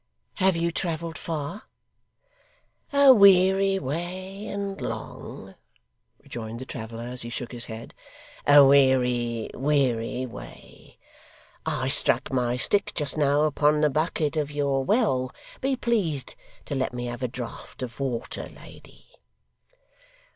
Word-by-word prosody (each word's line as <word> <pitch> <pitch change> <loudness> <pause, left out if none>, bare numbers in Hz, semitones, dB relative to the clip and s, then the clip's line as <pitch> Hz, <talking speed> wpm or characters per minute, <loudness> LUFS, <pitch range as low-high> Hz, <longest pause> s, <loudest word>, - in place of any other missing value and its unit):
'Have 190 -2 +3
you 170 0 0
travelled 165 -1 -3
far?' 165 +4 -5 1.3
'A 280 -2 +8
weary 195 -2 +5
way 185 +7 -5
and 200 -1 -4
long,' - - -7 0.7
rejoined 115 -1 -7
the 130 - -7
traveller 115 -2 -7
as 125 +1 -2
he 120 - -5
shook 120 0 -5
his 120 -2 -5
head. 110 0 -9 0.5
'A 145 -1 +9
weary, 125 -4 +3
weary, 130 -4 0
way. 120 - -12 0.7
I - - -1
struck - - +2
my 125 -1 +1
stick 200 +10 +1
just 150 -2 -1
now 145 -1 +3
upon 150 0 +2
the 150 -1 +3
bucket 155 0 0
of 150 -2 0
your 140 -2 0
well 130 - +1 0.3
be 270 0 0
pleased 200 - -1 0.3
to - - -5
let 130 -2 -1
me 120 0 -3
have 120 +1 -5
a 125 - 0
draught 125 +1 -8
of 120 0 -7
water, 130 -4 -4
lady. - - -15
145 Hz, 130 wpm, -26 LUFS, 125-180 Hz, 1.3 s, A